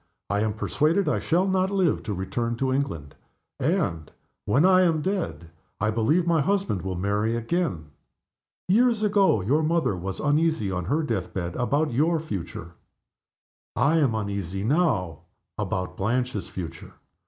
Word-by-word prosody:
I 100 - +1
am 110 0 0
persuaded 155 - +1
I - - +1
shall 180 +4 +1
not 190 0 +1
live 190 -5 +1
to 105 - -2
return 115 +6 -2
to 130 +2 0
England; 85 - -3 0.5
and, 130 - 0 0.4
when 135 - +3
I 185 0 +6
am 165 -4 +2
dead, 180 - -3 0.3
I 105 +1 +1
believe 120 +11 +2
my 165 -2 +3
husband 195 - 0
will 95 -1 -4
marry 105 +5 0
again. 115 - -2 0.8
Years 225 +3 +3
ago 200 - +3
your 135 +12 +2
mother 160 - +1
was 95 +2 -5
uneasy, 150 -8 +1
on 90 -1 -3
her 150 - 0
death 110 - -3
bed, 85 -2 -3
about 145 +3 0
your 160 +6 +2
future. 95 - -6 1.0
I 150 +4 +3
am 130 -7 +2
uneasy, 100 -3 -3
now, 110 - +1 0.4
about 90 0 -2
Blanche's 120 +1 -1
future. 85 -3 -7
125 Hz, 150 wpm, -25 LUFS, -, 1.0 s, I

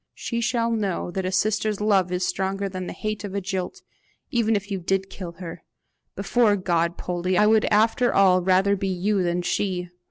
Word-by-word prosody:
She 235 -1 -3
shall 235 -1 0
know 200 -6 -2
that 190 +1 -2
a - - -2
sister's 210 +1 0
love 195 -4 +2
is 180 0 0
stronger 195 +1 -2
than 185 -1 -5
the - - -4
hate 215 -1 -4
of 200 -1 -6
a - - +1
jilt 190 - -4 0.5
even 225 -2 +2
if 205 0 -3
you 195 - -1
did 195 +2 -1
kill 175 -3 -7
her. 170 -1 -8 0.5
Before 230 -4 +2
God, 170 -3 0
Poldie, 180 +1 -1
I 210 - +5
would 215 0 +4
after 225 +3 +3
all 185 -2 +4
rather 190 +2 +3
be 195 0 -3
you 190 +2 0
than 175 0 0
she. 180 -1 -1
195 Hz, 195 wpm, -24 LUFS, 180-210 Hz, 0.5 s, I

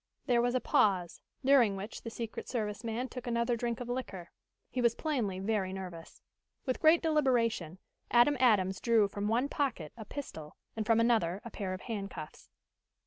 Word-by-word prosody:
There 240 -3 +3
was 245 +1 +1
a - - +3
pause, 185 -7 +1 0.2
during 255 -7 +5
which 195 +3 -7
the 230 - -6
secret 230 -1 -6
service 215 -3 -3
man 230 +3 -2
took 250 -1 -8
another 235 0 +1
drink 235 0 -2
of 245 - -5
liquor. 245 -8 -5 0.4
He 255 - -1
was 235 -1 +3
plainly 245 - -1
very 195 -1 -1
nervous. 180 -3 -8 0.4
With 255 -2 -1
great 320 +2 +5
deliberation, 245 - +1 0.3
Adam 240 +5 +5
Adams 195 -7 +3
drew 230 -3 +4
from 200 +1 -3
one 240 +5 +2
pocket 255 - -2
a 220 - -9
pistol, 160 - -8 0.2
and 220 -1 -3
from 225 -1 +4
another 220 -6 +2
a 235 - -7
pair 190 -3 -3
of 185 - -10
handcuffs. 200 -8 -7
230 Hz, 175 wpm, -32 LUFS, 195-245 Hz, 0.4 s, during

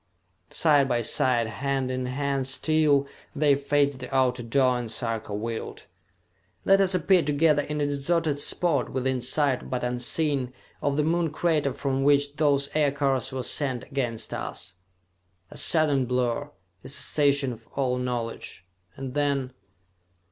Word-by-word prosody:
Side 145 -4 +3
by 120 -1 0
side, 120 +1 +2
hand 130 +3 -2
in 130 0 -3
hand 135 0 -2
still, 145 0 +2 0.3
they 145 -1 +3
faced 140 -1 +1
the 125 -1 -8
outer 130 -2 +1
door, 125 +1 +1
and 115 -2 -5
Sarka 115 -3 -3
willed: 110 +2 -5 0.8
"Let 195 0 +5
us 190 -1 +3
appear 185 +1 +3
together 150 0 +2
in 150 +1 -4
a 145 - +1
deserted 145 +1 0
spot, 145 -3 +1
within 130 -1 -1
sight 140 -1 +1
but 125 -1 -3
unseen, 125 +2 -1 0.3
of 145 0 0
the 150 - +2
Moon 165 +1 +1
crater 155 -2 0
from 135 0 -2
which 145 0 +2
those 140 -2 +2
aircars 140 -3 +1
were 130 -1 -4
sent 130 -3 0
against 125 -6 -3
us!" - - -5 0.8
A - - -9
sudden 145 -5 +3
blur, 125 +3 -1 0.3
a - - -9
cessation 140 -1 +1
of 115 0 -15
all 130 -2 0
knowledge, 120 -7 -5 0.3
and 130 -1 -6
then.... 140 -3 -1
140 Hz, 145 wpm, -26 LUFS, 125-145 Hz, 0.8 s, Let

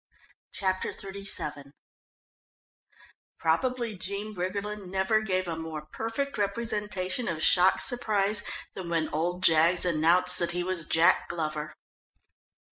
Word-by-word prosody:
Chapter 185 -1 -1
XXXVII 190 -8 -4 1.6
Probably 235 +7 0
Jean 200 +3 -5
Briggerland 200 +2 -4
never 190 +4 +1
gave 185 -3 -1
a 165 - -2
more 160 -2 -6
perfect 225 - -3
representation 210 0 -2
of 160 -2 -2
shocked 185 +1 +4
surprise 210 -4 +1 0.3
than 180 -3 -6
when 165 -2 0
old 175 +4 -2
Jaggs 170 +2 +4
announced 175 +2 +4
that 170 0 0
he 175 0 -1
was 180 -3 -1
Jack 170 +3 +3
Glover. 155 -2 -3
185 Hz, 115 wpm, -28 LUFS, 165-205 Hz, 1.6 s, shocked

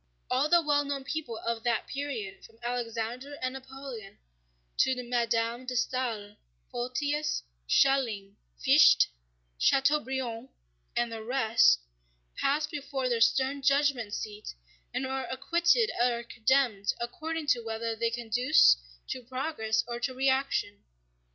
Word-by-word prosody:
All 265 +4 +2
the 345 0 +5
well 290 -1 +2
known 280 -1 -3
people 275 -5 -4
of 230 -1 -1
that 235 -1 0
period, 250 -9 -5
from 225 - -16
Alexander 240 +3 -3
and 255 0 -2
Napoleon 265 -6 -9 0.6
to 255 -1 +2
Madame 235 0 -1
de 250 - -3
Staël, 235 -5 -2 0.3
Photius, 285 +5 -2 0.2
Schelling, 225 - +2 0.2
Fichte, - - +6 0.5
Chateaubriand, 265 - +1 0.5
and 240 -1 0
the 225 -1 -5
rest, 230 - +3 0.5
pass 295 +2 +1
before 275 -3 -3
their 235 -2 0
stern 265 +4 +2
judgment 275 -6 +2
seat 210 - -6 0.4
and 265 - -2
are 265 -1 -3
acquitted 340 - +2
or 240 -1 +1
condemned 235 -3 +1
according 315 +6 -4
to 250 -5 +2
whether 225 0 -3
they 230 +1 0
conduced 230 - +4 0.3
to 255 - -4
progress 245 -3 -1
or 240 0 -4
to 255 +1 -2
reaction. 265 -5 0
250 Hz, 125 wpm, -29 LUFS, 230-275 Hz, 0.6 s, Fichte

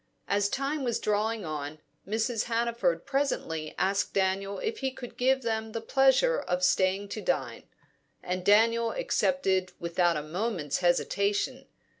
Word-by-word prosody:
As 200 0 +1
time 275 +4 -2
was 240 -3 0
drawing 215 0 0
on, 150 -1 -5 0.3
Mrs. 225 +2 0
Hannaford 230 -7 0
presently 270 - -2
asked 195 +1 0
Daniel 195 +1 0
if 445 0 -3
he 265 - 0
could 255 -2 -10
give 265 +1 +2
them 220 -1 -2
the 230 - -2
pleasure 270 - +3
of 180 0 -2
staying 185 +2 +2
to 215 - -5
dine; 150 - -2 0.6
and 180 0 -3
Daniel 230 +3 +4
accepted 195 - 0
without 170 0 +1
a 150 - -3
moment's 165 -3 -2
hesitation. 200 +8 0
205 Hz, 140 wpm, -28 LUFS, 180-240 Hz, 0.6 s, Daniel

